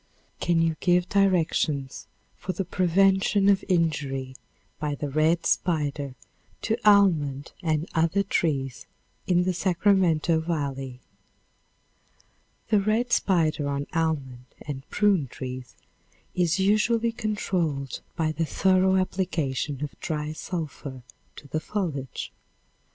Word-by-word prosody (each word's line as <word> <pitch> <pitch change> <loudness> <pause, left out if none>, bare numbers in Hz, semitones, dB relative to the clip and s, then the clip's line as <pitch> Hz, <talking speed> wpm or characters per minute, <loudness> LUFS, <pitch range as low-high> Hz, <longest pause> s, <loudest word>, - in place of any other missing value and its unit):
Can 175 -1 +2
you 165 -1 0
give 180 0 +2
directions 160 -8 +1 0.3
for 185 - -4
the 195 - -3
prevention 195 +3 +3
of 195 -1 +3
injury 140 -7 0 0.4
by 150 -2 -2
the 145 0 -4
red 160 +3 +2
spider 145 -6 0 0.5
to 220 - +1
almond 165 -10 +4
and 160 -1 0
other 165 +4 +2
trees 135 -9 -1 0.4
in 180 -1 +3
the 185 0 0
Sacramento 175 -3 +2
volley? 135 -6 -3 1.7
The 210 -1 +4
red 225 +4 +1
spider 160 -6 +2
on 140 0 -2
almond 140 -7 -1 0.2
and 140 -2 -7
prune 200 -9 +2
trees 125 0 -7 0.6
is 175 -1 +1
usually 220 +4 +2
controlled 175 - -2
by 160 -1 0
the 160 +2 -1
thorough 190 +4 +3
application 160 -7 -1
of 150 - -4
dry 150 -1 -3
sulphur 150 -6 -6 0.3
to 145 - -12
the 155 - -1
foliage. 155 - -4
165 Hz, 110 wpm, -26 LUFS, 145-190 Hz, 1.7 s, almond